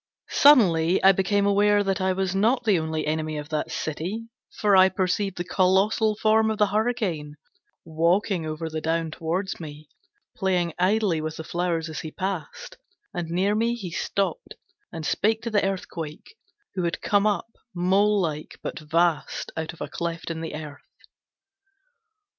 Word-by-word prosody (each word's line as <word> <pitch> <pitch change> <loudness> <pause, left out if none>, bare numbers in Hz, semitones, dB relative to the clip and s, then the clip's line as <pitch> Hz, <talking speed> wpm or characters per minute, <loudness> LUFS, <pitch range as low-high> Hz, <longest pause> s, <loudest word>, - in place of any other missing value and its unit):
Suddenly 185 - +5
I 195 - +9
became 200 +1 +1
aware 205 +1 +3
that 195 0 -1
I 190 0 +2
was 190 0 -1
not 225 +6 +2
the 205 -6 +3
only 160 -1 -2
enemy 155 0 -2
of 150 0 -6
that 155 -1 -2
city, 185 +9 -4 0.3
for 205 -2 +3
I 190 0 +7
perceived 190 +1 -1
the 175 - -2
colossal 195 +4 +2
form 220 +1 +3
of 220 - -1
the 210 - +4
Hurricane 210 -10 -1 0.5
walking 170 +3 +1
over 155 +1 -4
the 155 0 -4
down 165 0 -1
towards 170 +5 -3
me, 150 -2 -9 0.5
playing 180 -4 0
idly 190 -3 +2
with 155 0 -4
the 160 - -5
flowers 170 -1 -2
as 155 - -6
he 160 - -6
passed, 185 -2 -5 0.4
and 175 -2 -4
near 185 +4 +1
me 230 +2 +1
he 195 -7 -7
stopped 200 - -2 0.4
and 160 -3 -6
spake 220 +6 +1
to 235 - -3
the 205 -1 +2
Earthquake, 180 - -5 0.4
who 185 - -2
had 170 -1 -2
come 205 0 +3
up 210 +3 -1 0.2
mole 200 +4 +3
like 155 -4 -3
but - - -4
vast 165 +1 0
out 160 0 -3
of 170 - -15
a - - -3
cleft 170 0 -4
in 160 0 -5
the 165 - -5
earth. 150 -2 -8
180 Hz, 165 wpm, -25 LUFS, 160-205 Hz, 0.5 s, I